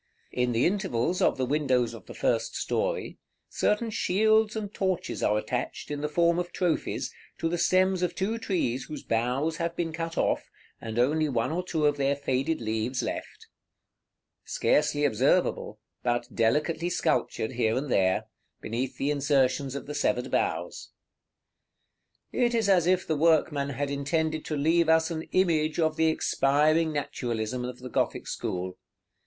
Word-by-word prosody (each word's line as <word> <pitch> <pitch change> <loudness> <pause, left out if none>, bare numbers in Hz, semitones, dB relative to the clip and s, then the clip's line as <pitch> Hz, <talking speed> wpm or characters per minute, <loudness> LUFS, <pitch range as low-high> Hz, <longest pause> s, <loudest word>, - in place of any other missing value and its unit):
In 125 0 0
the 115 +2 +2
intervals 180 - 0
of - - +3
the 130 - 0
windows 130 -4 +1
of 115 - -11
the - - -9
first 115 -1 0
story, - - -2 0.3
certain 220 +2 0
shields 215 +2 +2
and 210 -2 -4
torches 190 -3 -2
are 105 - +2
attached, 105 - -3
in 145 0 -3
the 150 - -1
form 170 +2 +2
of 175 0 -3
trophies, 175 -4 -1 0.2
to 165 - -1
the 170 +1 -1
stems 185 +1 +3
of 180 -1 -1
two 220 +4 -1
trees 135 - -1
whose 155 - -7
boughs 125 +8 0
have 170 0 -2
been 165 -2 -2
cut 165 0 -4
off, - - 0 0.3
and 110 0 -5
only 150 +5 +2
one 120 +1 0
or 175 +3 -1
two 160 -4 -1
of 145 0 +2
their 140 0 +1
faded 140 +2 -1
leaves 110 +3 -1
left, - - -5 1.0
scarcely 150 -1 +1
observable, 130 - +1 0.2
but 120 -1 -1
delicately 150 +9 +1
sculptured 155 -9 0
here 115 -2 +1
and 135 0 -3
there, 95 -3 +2 0.4
beneath 125 +3 -3
the 140 +2 0
insertions 140 -1 +1
of 140 - -5
the 150 - -6
severed - - 0
boughs. - - -2 1.4
It 240 -1 +1
is 225 -3 +1
as 180 -4 +4
if 185 0 +2
the 160 - 0
workman 150 -2 +2
had 140 +1 -3
intended 155 +2 -1
to 155 - -2
leave 160 +3 +3
us 160 0 +4
an 160 -1 -3
image 160 -4 +2
of 160 -1 +2
the 160 0 +2
expiring 155 +1 +2
naturalism 125 -4 -3
of 125 0 -5
the 125 0 -8
Gothic - - -1
school. 90 0 -4
150 Hz, 160 wpm, -27 LUFS, 125-170 Hz, 1.4 s, as